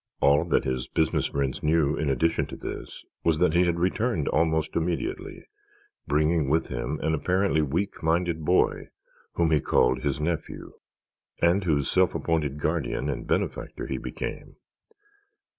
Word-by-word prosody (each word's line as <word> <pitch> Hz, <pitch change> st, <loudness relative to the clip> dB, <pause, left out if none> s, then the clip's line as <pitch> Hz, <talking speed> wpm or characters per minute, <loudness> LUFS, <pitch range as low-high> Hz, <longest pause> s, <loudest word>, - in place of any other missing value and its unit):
All 70 Hz, +1 st, +4 dB
that -, -, +2 dB
his 65 Hz, -1 st, -2 dB
business 80 Hz, -1 st, +1 dB
friends 70 Hz, -2 st, -2 dB
knew 75 Hz, -1 st, +2 dB
in 75 Hz, -, -1 dB
addition 75 Hz, +5 st, +1 dB
to -, -, -8 dB
this -, -, -8 dB, 0.2 s
was 80 Hz, -2 st, +2 dB
that 90 Hz, -1 st, +3 dB
he 90 Hz, +1 st, +4 dB
had 85 Hz, -1 st, 0 dB
returned 95 Hz, -, 0 dB
almost 80 Hz, 0 st, +1 dB
immediately, 85 Hz, 0 st, -3 dB, 0.6 s
bringing 75 Hz, 0 st, +2 dB
with 80 Hz, +3 st, +1 dB
him -, -, -3 dB
an 80 Hz, -, +1 dB
apparently 90 Hz, +1 st, +1 dB
weak 80 Hz, +8 st, -2 dB
minded 80 Hz, 0 st, 0 dB
boy 90 Hz, +4 st, +2 dB, 0.4 s
whom 85 Hz, -1 st, +1 dB
he 75 Hz, -, +4 dB
called 65 Hz, 0 st, +2 dB
his 70 Hz, 0 st, -1 dB
nephew 80 Hz, +2 st, -4 dB, 0.7 s
and 90 Hz, +3 st, +3 dB
whose 70 Hz, -5 st, +1 dB
self 95 Hz, -2 st, +3 dB
appointed 75 Hz, -4 st, -1 dB
guardian 75 Hz, -3 st, -1 dB
and 65 Hz, -, -6 dB
benefactor -, -, -2 dB
he -, -, -3 dB
became. -, -, -6 dB
80 Hz, 150 wpm, -26 LUFS, 70-85 Hz, 0.7 s, All